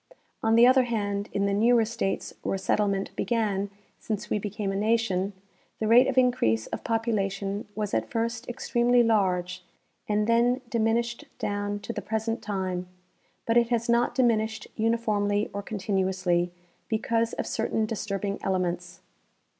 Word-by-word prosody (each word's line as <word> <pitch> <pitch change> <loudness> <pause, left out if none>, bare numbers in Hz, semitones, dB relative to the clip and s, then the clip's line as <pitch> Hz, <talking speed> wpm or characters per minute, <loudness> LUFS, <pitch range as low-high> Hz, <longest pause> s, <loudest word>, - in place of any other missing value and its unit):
On 225 0 +3
the 235 +1 +8
other 255 0 +5
hand, 205 -3 -2
in 200 - 0
the 200 - +1
newer 230 +2 +4
states 215 -3 -3
Avhere 195 - -1
settlement 200 0 0
began 205 -4 0 0.3
since 215 -2 -4
we 210 - +2
became 205 0 -3
a - - -3
nation, 205 -2 +1 0.5
the 220 - -1
rate 240 +3 +7
of 265 - -2
increase 180 - +3
of - - -6
population 205 -3 -1
was 210 -1 -3
at - - 0
first 230 -1 -2
extremely 240 0 +2
large 185 -5 +1 0.5
and 210 0 +2
then 240 +3 +3
diminished 235 +1 0
down 205 0 -2
to 235 - -5
the 210 - -4
present 220 +3 -2
time; 185 -3 -3 0.6
but 230 +1 +2
it 235 -1 +4
has 235 -1 0
not 235 +1 +2
diminished 220 -3 +1
uniformly 215 -2 0
or 200 - -3
continuously, 190 -3 0 0.4
be 220 - +2
cause 230 +1 0
of - - -3
certain 220 -1 -1
disturbing 200 -2 -3
elements. 180 -1 -2
215 Hz, 150 wpm, -27 LUFS, 195-230 Hz, 0.6 s, the